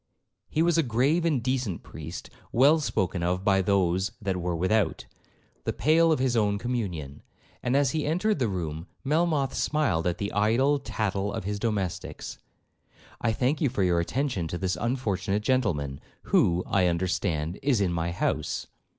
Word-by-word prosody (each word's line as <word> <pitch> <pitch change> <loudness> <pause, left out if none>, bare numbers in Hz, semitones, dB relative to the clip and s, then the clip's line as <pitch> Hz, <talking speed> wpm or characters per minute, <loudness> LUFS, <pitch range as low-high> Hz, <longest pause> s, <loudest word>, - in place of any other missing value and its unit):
He 160 - +1
was 170 -1 +3
a - - +6
grave 135 +6 +1
and 145 -8 +1
decent 125 -8 -1
priest, - - -8 0.2
well 140 +6 +5
'spoken 95 - -1
of 90 +2 0
by 95 -1 +4
those 95 0 +1
that 100 -4 -2
were 90 0 -1
without' 95 +1 +1 0.6
the - - -1
pale 165 +3 +4
of 155 - +3
his 130 -1 +1
own 105 -2 +2
communion; 90 - -4 0.4
and 125 +2 0
as 140 -3 +3
he 155 -2 -1
entered 180 +5 +1
the 125 - +2
room, 85 -3 -4 0.2
Melmoth 150 -1 +1
smiled 140 - +1
at 90 0 0
the 100 +2 -3
idle 120 +8 +3
tattle 105 -6 -2
of - - -4
his 100 +2 -3
domestics. 100 -6 -3 0.8
'I 115 -1 +1
thank 130 +6 0
you 145 - +3
for 110 -6 -1
your 90 -2 +3
attention 110 - -1
to 85 - -4
this 95 0 -1
unfortunate 105 -5 -1
gentleman, 85 - 0 0.2
who, 85 +1 +3
I 95 -2 +2
understand, 85 -1 -1
is 135 -5 +2
in 95 -3 +1
my 85 0 -1
house.' 85 - -1
105 Hz, 170 wpm, -27 LUFS, 90-135 Hz, 0.8 s, a